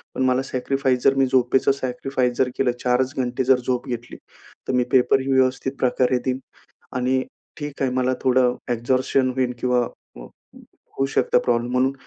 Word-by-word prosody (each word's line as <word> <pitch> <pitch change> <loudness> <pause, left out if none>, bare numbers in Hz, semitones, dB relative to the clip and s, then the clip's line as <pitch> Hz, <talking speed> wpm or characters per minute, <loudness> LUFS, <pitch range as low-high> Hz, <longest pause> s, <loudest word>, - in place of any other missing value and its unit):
पण 130 - 0
मला 130 0 +2
सॅक्रिफाईस 130 0 -1
जर 135 - +5
मी 135 - +3
झोपेचं 130 +1 +2
सॅक्रिफाईस 130 -1 -2
जर 130 -1 +2
केलं, 130 -2 +2
4 125 +1 +3
च 130 +2 -8
घंटे 125 0 -1
जर 130 -1 +4
झोप 125 -1 -1
घेतली 120 0 -6 0.5
तर - - -1
मी 125 -1 +3
पेपर 130 +1 +4
ही 135 +1 -2
व्यवस्थित 130 +1 +1
प्रकारे 125 0 +2
देईन 130 0 -1 0.6
आणि 130 +1 +1 0.4
ठीक 145 -2 -7
आहे, 130 - +1
मला 130 0 +1
थोडं 125 -1 +3 0.2
एक्झर्शन 130 +2 +1
होईल 125 -1 0
किंवा 125 -1 +2 0.4
अ, - - -9 0.7
होऊ 135 - +2
शकता 125 - +3
प्रॉब्लेम. 120 0 0
म्हणून 130 +2 +2
130 Hz, 175 wpm, -22 LUFS, 125-130 Hz, 0.7 s, जर